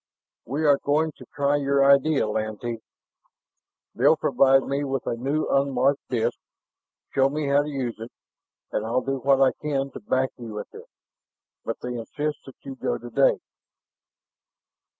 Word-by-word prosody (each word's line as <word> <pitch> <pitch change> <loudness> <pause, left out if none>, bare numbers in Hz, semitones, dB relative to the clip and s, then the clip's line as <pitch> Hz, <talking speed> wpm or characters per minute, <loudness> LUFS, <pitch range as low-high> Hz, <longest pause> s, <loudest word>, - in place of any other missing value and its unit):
"We 145 +6 -1
are 140 -2 +5
going 155 +2 +1
to - - -13
try 145 0 +2
your 140 -1 +2
idea, 140 -1 +4
Lantee. 110 +2 -3 1.1
They'll - - +4
provide 135 0 +4
me 140 +1 -2
with 135 -2 -3
a - - -1
new, 140 +6 -1
unmarked 135 0 +2
disk, 120 -3 -1 0.7
show 135 0 +3
me 150 +1 -2
how 140 +1 +4
to 150 - -5
use 130 -6 -4
it. 115 +2 -8 0.6
And 105 - -1
I'll 115 +3 0
do 135 0 -2
what 135 +1 +3
I 135 -1 +5
can 140 -2 -1
to - - -8
back 130 0 0
you 115 -3 -7
with 105 - -7
it. - - -12 0.7
But - - -5
they 125 - -4
insist 145 +6 -4
that 135 - -11
you 135 - -7
go - - -2
today." 120 +3 +2
135 Hz, 160 wpm, -25 LUFS, 125-140 Hz, 1.1 s, are